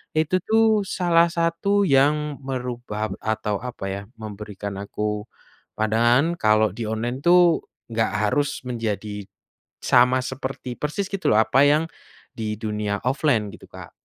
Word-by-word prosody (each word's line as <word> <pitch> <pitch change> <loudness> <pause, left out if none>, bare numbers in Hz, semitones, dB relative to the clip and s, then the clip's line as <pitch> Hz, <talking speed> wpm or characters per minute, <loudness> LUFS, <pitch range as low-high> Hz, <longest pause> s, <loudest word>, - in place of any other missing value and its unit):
itu 160 +4 +2
tuh 220 0 +2
salah 170 -2 +3
satu 170 +4 +1
yang 150 -1 +2
merubah 125 -5 -4
atau 110 -2 -2
apa 125 -4 -7
ya, 100 +1 -4
memberikan 105 -2 -7
aku 105 +1 -3 0.5
pandangan 120 +10 +2
kalau 110 -1 +3
di 110 +2 -5
online 115 +4 -2
tuh, 175 +2 +5 0.3
nggak 110 -2 0 0.2
harus 145 -2 -1
menjadi, 105 -4 -4 0.5
sama 125 +1 +4
seperti 130 0 -5
persis 155 +9 -3
gitu 195 -1 -1
loh 105 - +5
apa 130 +5 +4
yang, 150 +3 +3 0.5
di 110 -1 -2
dunia 105 -2 -2
offline 130 -5 +1
gitu, - - -13
Kak. - - -11
125 Hz, 130 wpm, -23 LUFS, 110-155 Hz, 0.5 s, tuh